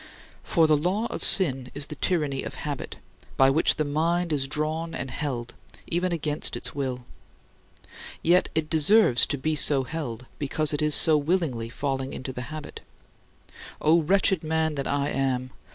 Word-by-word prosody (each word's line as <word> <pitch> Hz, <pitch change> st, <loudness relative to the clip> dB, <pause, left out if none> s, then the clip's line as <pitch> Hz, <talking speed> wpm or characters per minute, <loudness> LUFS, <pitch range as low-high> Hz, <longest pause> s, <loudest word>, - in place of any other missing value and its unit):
For 165 Hz, -4 st, +2 dB
the 155 Hz, -1 st, +4 dB
law 180 Hz, +9 st, -1 dB
of -, -, -5 dB
sin 135 Hz, -, +4 dB
is 145 Hz, 0 st, -3 dB
the 150 Hz, -, -8 dB
tyranny 150 Hz, -4 st, -1 dB
of -, -, -7 dB
habit, 145 Hz, -3 st, -5 dB, 0.4 s
by 135 Hz, 0 st, +5 dB
which 155 Hz, +4 st, +2 dB
the 155 Hz, -, -1 dB
mind 165 Hz, +3 st, 0 dB
is 135 Hz, -2 st, 0 dB
drawn 155 Hz, +3 st, -3 dB
and 135 Hz, -, -5 dB
held, 125 Hz, -5 st, -4 dB, 0.3 s
even 175 Hz, +2 st, -1 dB
against 155 Hz, -2 st, 0 dB
its -, -, -5 dB
will. 130 Hz, -3 st, -4 dB, 1.2 s
Yet 175 Hz, +2 st, +3 dB
it 160 Hz, -1 st, 0 dB
deserves 160 Hz, -, +4 dB
to 145 Hz, -, -2 dB
be 155 Hz, +3 st, -1 dB
so 140 Hz, -2 st, +4 dB
held 125 Hz, -5 st, -6 dB
because 150 Hz, +1 st, 0 dB
it 150 Hz, +1 st, 0 dB
so 155 Hz, 0 st, +6 dB
willingly 145 Hz, -7 st, -1 dB
falls 135 Hz, +2 st, -3 dB
into 130 Hz, 0 st, -6 dB
the 125 Hz, +1 st, -7 dB
habit. 155 Hz, -1 st, -8 dB, 1.0 s
"O 165 Hz, +2 st, +3 dB
wretched 190 Hz, +1 st, +2 dB
man 160 Hz, 0 st, 0 dB
that 140 Hz, -2 st, -4 dB
I 140 Hz, 0 st, -1 dB
am! 130 Hz, -2 st, -2 dB
150 Hz, 165 wpm, -25 LUFS, 135-160 Hz, 1.2 s, so